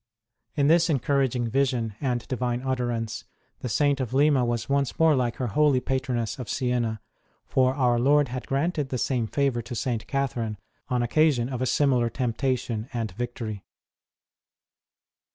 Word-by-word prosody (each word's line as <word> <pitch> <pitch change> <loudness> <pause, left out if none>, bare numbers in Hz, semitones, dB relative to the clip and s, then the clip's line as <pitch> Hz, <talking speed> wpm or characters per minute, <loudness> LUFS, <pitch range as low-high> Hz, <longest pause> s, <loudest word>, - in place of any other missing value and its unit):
In 145 -2 +2
this 165 +2 +4
encouraging 135 -4 +1
vision 120 -3 0
and 125 -4 -1
Divine 125 -1 -2
utterance 120 -4 -2 0.3
the 125 - -4
Saint 140 +5 +2
of 130 -1 -3
Lima 140 -2 +4
was 120 -1 -1
once 140 -2 0
more 160 -2 +5
like 120 -3 0
her 130 - -3
holy 145 +4 +3
patroness 130 -3 -2
of 120 -4 -6
Siena; 120 -4 -1 0.5
for 130 0 +2
our 125 -4 +2
Lord 145 +2 +3
had 130 +1 -5
granted 145 0 -1
the 130 - -2
same 120 -2 0
favour 135 -1 0
to 120 - -7
St. 115 -2 -2
Catherine, 120 -6 -2 0.3
on 125 -1 +1
occasion 130 -1 +2
of 130 -2 -4
a 130 - +1
similar 125 -5 +2
temptation 120 -1 -2
and 115 -4 -3
victory. 110 -1 -5
125 Hz, 150 wpm, -26 LUFS, 120-140 Hz, 0.5 s, more